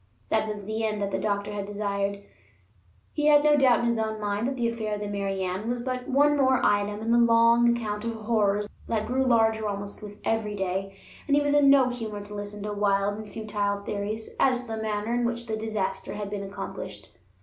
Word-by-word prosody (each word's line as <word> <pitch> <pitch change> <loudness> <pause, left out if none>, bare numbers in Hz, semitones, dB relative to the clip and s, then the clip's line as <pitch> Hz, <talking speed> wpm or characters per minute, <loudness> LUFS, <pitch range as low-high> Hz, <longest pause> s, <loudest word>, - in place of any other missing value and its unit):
That 220 0 +1
was 210 -2 -5
the 220 +2 -3
end 215 -1 -1
that 200 -1 -2
the 190 - -1
doctor 205 +1 -1
had 200 -1 -4
desired. 200 -1 -2 0.9
He 295 -1 +1
had 295 -1 +6
no 300 0 +5
doubt 260 -5 +4
in - - 0
his 235 -1 +1
own 220 0 -2
mind 205 +2 -1
that 270 - -2
the 235 -1 +1
affair 220 -2 -2
of - - -6
the 205 - -4
Mary 195 -1 -2
Ann 185 +5 -3
was 245 0 -1
but 255 -1 -3
one 290 +2 +4
more 260 -2 +3
item 205 +1 +1
in 225 +1 -1
the 235 - +5
long 235 0 +5
account 210 -2 -4
of 230 0 -3
horrors 210 -2 +1 0.2
that 220 -2 -1
grew 255 +4 +1
larger 225 -3 +3
almost 200 0 -5
with 205 -1 -9
every 220 -2 -1
day; 195 0 -3 0.3
and 285 - +3
he 290 - +4
was 290 0 +1
in 290 -1 +5
no 270 -2 +6
humor 220 -4 -5
to 205 - -10
listen 205 0 -6
to 210 0 -3
wild 205 0 +1
and 215 -1 -8
futile 205 -2 -2
theories 210 +2 -4
as 255 -2 +3
to 250 - -13
the 220 - -4
manner 215 +1 -2
in 240 0 +1
which 235 0 -2
the 220 -2 -2
disaster 215 -3 -3
had 205 -1 -5
been 205 -1 -3
accomplished. 195 0 -7
215 Hz, 225 wpm, -26 LUFS, 205-235 Hz, 0.9 s, had